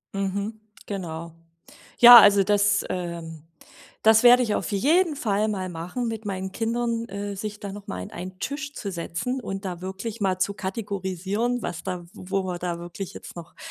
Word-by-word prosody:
Mhm, 200 +3 -3 0.3
genau. 170 -4 -6 0.7
Ja, 240 0 +12
also 205 -2 +6
das 205 0 +2
ähm, 170 -3 -5 0.6
das 220 0 +6
werde 245 +1 +8
ich 215 -3 -1
auf - - -3
jeden 305 - +2
Fall 215 -4 0
mal 190 -3 -3
machen 180 +8 -4
mit 225 -1 -5
meinen 190 -1 -4
Kindern, 230 +1 -1
äh, 200 0 -5
sich 210 +1 -6
da 200 -1 -6
noch 205 0 -10
mal - - -5
an 205 - -10
einen 185 +1 -8
Tisch 285 +1 -4
zu 200 -8 -5
setzen 180 +9 -3
und 195 -3 -5
da 180 -1 -5
wirklich 205 +4 -6
mal 190 -2 +1
zu 200 +2 +1
kategorisieren, 200 +3 -3
was 170 - -5
da 180 -2 -4
wo 190 +1 -3
wir 180 -1 -4
da 175 -1 -3
wirklich 175 +2 -7
jetzt - - -10
noch 170 0 -10
200 Hz, 180 wpm, -25 LUFS, 185-220 Hz, 0.7 s, Ja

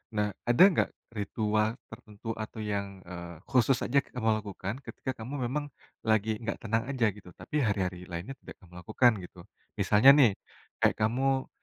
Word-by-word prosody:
Nah, 105 0 +1 0.2
ada 120 +8 +7
nggak - - +1 0.3
ritual 105 +1 0 0.2
tertentu 105 +1 -12 0.2
atau 110 0 -8
yang, 100 -2 -2 0.2
eee, 85 -2 -8
khusus 130 0 +4
aja 140 - +1
kamu 115 -3 -2
lakukan 100 0 -5
ketika 130 - -5
kamu 130 - -7 0.2
memang 145 +3 -2 0.4
lagi 110 0 +2
nggak 110 - -2
tenang 115 0 0
aja, 130 -4 +1
gitu? 95 -3 -13
Tapi 150 - -9
hari-hari 90 -3 -2
lainnya 90 +11 -5
tidak - - -11
kamu 90 -2 -18
lakukan, 120 +4 +4
gitu? 90 - -16 0.4
Misalnya 105 +5 +6
nih, 140 -6 +6 0.5
kayak - - +4
kamu 130 +4 +1
110 Hz, 160 wpm, -29 LUFS, 100-125 Hz, 0.5 s, ada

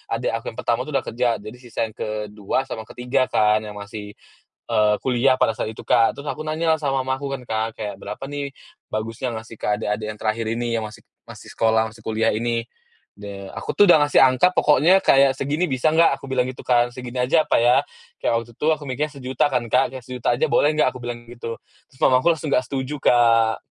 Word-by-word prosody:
Adek 115 - -1
aku - - -26
yang - - -13
pertama 120 -1 +1
tuh 150 - -5
udah - - +1
kerja, 125 +2 -1 0.2
jadi 110 +3 -9
sisa 120 -3 -4
yang 110 - -9
ke-2 105 +2 -3
sama 115 - -6
ke-3 130 +1 -1
kan 105 0 +3
yang 105 -1 -8
masih, 105 0 -8 0.5
eee, 105 -2 +3
kuliah 130 +1 +2
pada 110 - +2
saat 110 - -3
itu, - - -11
Kak. 115 - +3
Terus 145 - -7
aku 155 - -4
nanyalah 160 +1 +1
sama 140 -3 -1
mamaku 130 +2 -3
kan, 135 -2 -4
Kak, 110 0 -1
kayak, 105 -2 -4
"Berapa 135 +7 -7
nih 145 -1 -5 0.4
bagusnya 115 +3 -3
ngasih 110 0 -8
ke - - -6
adek-adek 105 0 -2
yang 105 - -15
terakhir 110 +1 -1
ini, 120 +1 -2
yang 110 - -2
masih 110 0 -9 0.3
masih - - -12
sekolah, 110 0 +2
masih 110 +1 -17
kuliah 110 +1 0
ini?" 115 +1 -1 0.5
De 100 -1 -8
aku - - -4
tuh 205 - +5
udah 175 - +8
ngasih 145 - +2
angka 130 +7 +5
pokoknya 155 +4 +4
kayak, 135 -4 +5
"Segini, 150 +6 -1
bisa 130 +3 +1
nggak?" 165 -4 +4
Aku - - -10
bilang 130 -1 +1
gitu 130 - -10
kan, 120 -1 +3
"Segini 125 0 -8
aja 155 +5 +3
apa - - +3
ya?" 120 +1 +5 0.4
kayak - - +1
waktu 120 - -15
itu - - -2
aku 150 - -13
mikirnya, 145 +3 -3
sejuta 130 +1 0
kan, 125 -3 0
Kak. 130 - +2
"Sejuta 125 0 -1
aja - - +1
boleh 150 +1 +3
nggak?" 150 - +3
Aku 130 - -9
bilang 120 0 -6
gitu, 115 -1 -6 0.3
terus 130 - -24
mamaku 130 +4 +4
langsung 150 -1 -5
nggak 125 - +2
setuju, 135 +2 -3
Kak. 115 -2 +3
120 Hz, 215 wpm, -22 LUFS, 110-135 Hz, 0.5 s, udah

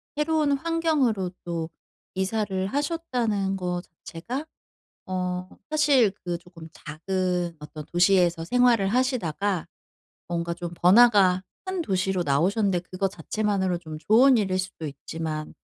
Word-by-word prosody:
새로운 300 0 +1
환경으로 285 - 0
또 170 -2 -3 0.5
이사를 190 -1 -1
하셨다는 245 - -1
거 180 -2 -2
자체가 190 - -7 0.6
어 180 0 -3 0.2
사실 290 -8 +4
그 175 -1 -2
조금 170 -2 -13
작은 180 +2 -2
어떤 150 0 -9
도시에서 175 -2 +3
생활을 240 -1 +3
하시다가 205 - 0 0.6
뭔가 170 0 -2
좀 175 0 -6
번화가 190 -1 +5 0.2
큰 375 -1 -2
도시로 190 - 0
나오셨는데 180 +6 +1
그거 185 +1 0
자체만으로 195 -3 -1
좀 160 -3 -8
좋은 240 - +5
일일 190 -3 0
수도 185 -3 -5
있지만 155 +2 -5
190 Hz, 275 characters per minute, -25 LUFS, 175-235 Hz, 0.6 s, 번화가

